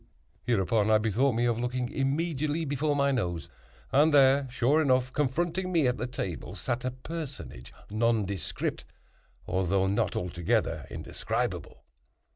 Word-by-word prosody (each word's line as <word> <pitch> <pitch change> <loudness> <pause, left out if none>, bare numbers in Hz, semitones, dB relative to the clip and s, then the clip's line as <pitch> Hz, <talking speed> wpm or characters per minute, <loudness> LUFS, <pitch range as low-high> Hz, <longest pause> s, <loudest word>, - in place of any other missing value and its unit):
Hereupon 110 -1 +1
I 110 - +6
bethought 115 +4 +1
me 120 +1 +2
of 120 -1 +1
looking 125 0 -2
immediately 155 +2 -1
before 145 +1 0
my 140 0 +2
nose, 90 -10 -2 0.4
and 150 +3 +5
there, 135 -1 +5
sure 130 +5 +2
enough, 130 -2 +2
confronting 170 +6 0
me 165 -5 +3
at 125 - 0
the 120 - -2
table 95 - -5
sat 120 +1 -3
a 130 - 0
personage 135 - -7 0.2
nondescript, 110 -5 -1 0.6
although 95 +1 +1
not 100 +1 0
altogether 85 -1 -1
indescribable. - - -4
125 Hz, 130 wpm, -28 LUFS, 110-145 Hz, 0.6 s, I